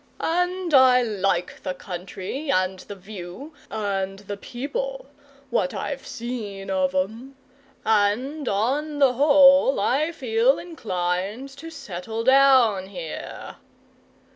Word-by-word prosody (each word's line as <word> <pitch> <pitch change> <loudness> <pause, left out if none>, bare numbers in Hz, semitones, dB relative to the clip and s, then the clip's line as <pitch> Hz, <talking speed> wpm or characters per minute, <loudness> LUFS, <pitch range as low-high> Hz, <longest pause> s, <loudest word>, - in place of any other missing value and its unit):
And 355 0 0
I 255 -2 +6
like 195 -5 -1
the 185 - -4
country, 190 - -6
and 185 -3 +1
the 205 - -9
view, 195 - -9 0.2
and 195 -3 -2
the 205 0 -7
people - - -5 0.5
what - - 0
I've - - -4
seen 215 -5 -5
of 185 -1 0
'em 225 +9 -3 0.5
and 225 +7 +1
on 280 +9 -1
the 275 -3 +4
whole 275 -1 +6
I 285 +10 +1
feel 245 -2 +2
inclined 200 - -3
to 320 +4 -10
settle 220 - -6
down 260 -7 +5
here." 175 -5 -7
230 Hz, 115 wpm, -24 LUFS, 195-275 Hz, 0.5 s, I